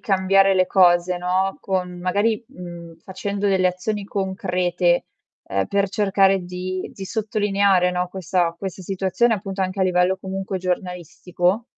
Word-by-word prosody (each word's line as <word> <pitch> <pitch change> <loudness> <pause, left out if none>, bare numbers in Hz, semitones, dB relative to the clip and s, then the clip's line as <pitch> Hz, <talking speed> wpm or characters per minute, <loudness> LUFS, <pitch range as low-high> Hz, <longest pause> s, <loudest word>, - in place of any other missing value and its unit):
cambiare 195 0 +3
le 185 -1 +3
cose 180 -1 +4
no, 185 +2 0
con 180 -2 -2
magari, 205 +5 0
mhmm 170 -2 -10
facendo 200 +3 -4
delle 185 -1 +3
azioni 200 +3 -3
concrete, 185 -3 0 0.4
ehm, 95 0 -1
per 200 0 +1
cercare 195 -1 +3
di 185 +1 -5
di 195 - -8
sottolineare, 200 -4 +1
no, 180 0 -1
questa 180 -2 0
questa 190 0 -6
situazione 190 +5 +1
appunto 195 -1 -4
anche 185 +1 -3
a 190 - +4
livello 180 +1 +2
comunque 190 0 -4
giornalistico? 180 +2 -2
185 Hz, 140 wpm, -22 LUFS, 180-195 Hz, 0.4 s, cose